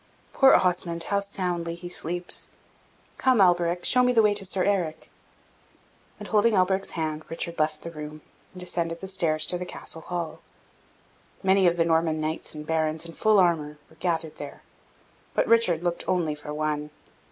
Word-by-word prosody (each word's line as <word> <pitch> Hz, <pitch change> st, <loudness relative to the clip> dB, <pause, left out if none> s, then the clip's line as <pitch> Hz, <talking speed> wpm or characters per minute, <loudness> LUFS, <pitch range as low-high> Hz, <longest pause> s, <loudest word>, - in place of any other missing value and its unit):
Poor 270 Hz, -1 st, +6 dB
Osmond, 175 Hz, -2 st, +1 dB
how 200 Hz, +4 st, 0 dB
soundly 180 Hz, -4 st, -3 dB
he 175 Hz, +1 st, -8 dB
sleeps! 175 Hz, 0 st, -4 dB, 0.7 s
Come, 255 Hz, -3 st, +3 dB
Alberic, 175 Hz, -1 st, +3 dB
show 250 Hz, -, +5 dB
me 250 Hz, 0 st, +4 dB
the 230 Hz, -2 st, +4 dB
way 210 Hz, -1 st, +4 dB
to 205 Hz, -1 st, +2 dB
Sir 185 Hz, 0 st, 0 dB
Eric!" 180 Hz, -6 st, -1 dB, 1.1 s
And, -, -, -9 dB
holding 215 Hz, +1 st, +3 dB
Alberic's 190 Hz, 0 st, +1 dB
hand, 155 Hz, -1 st, -2 dB
Richard 170 Hz, 0 st, -3 dB
left 155 Hz, 0 st, 0 dB
the 170 Hz, -, -6 dB
room, 150 Hz, -1 st, -8 dB, 0.3 s
and 180 Hz, -, -11 dB
descended 170 Hz, -2 st, -3 dB
the 190 Hz, -, -7 dB
stairs 160 Hz, -5 st, +1 dB
to 180 Hz, -, +2 dB
the -, -, -3 dB
Castle 160 Hz, -, -6 dB
hall. 170 Hz, -2 st, -5 dB, 1.0 s
Many 190 Hz, -1 st, +4 dB
of 175 Hz, 0 st, +2 dB
the 165 Hz, -, +3 dB
Norman 160 Hz, -1 st, +1 dB
knights 155 Hz, +1 st, -3 dB
and 150 Hz, 0 st, -7 dB
barons, 160 Hz, 0 st, -1 dB
in 165 Hz, -, -8 dB
full 215 Hz, +3 st, +3 dB
armour, 160 Hz, -5 st, +2 dB
were -, -, -18 dB
gathered 165 Hz, -2 st, -2 dB
there; 145 Hz, -1 st, -9 dB, 0.7 s
but -, -, +3 dB
Richard 205 Hz, -8 st, +3 dB
looked 175 Hz, -1 st, -1 dB
only 175 Hz, -4 st, +1 dB
for 150 Hz, 0 st, -8 dB
one. 150 Hz, 0 st, -2 dB
170 Hz, 175 wpm, -26 LUFS, 160-185 Hz, 1.1 s, Poor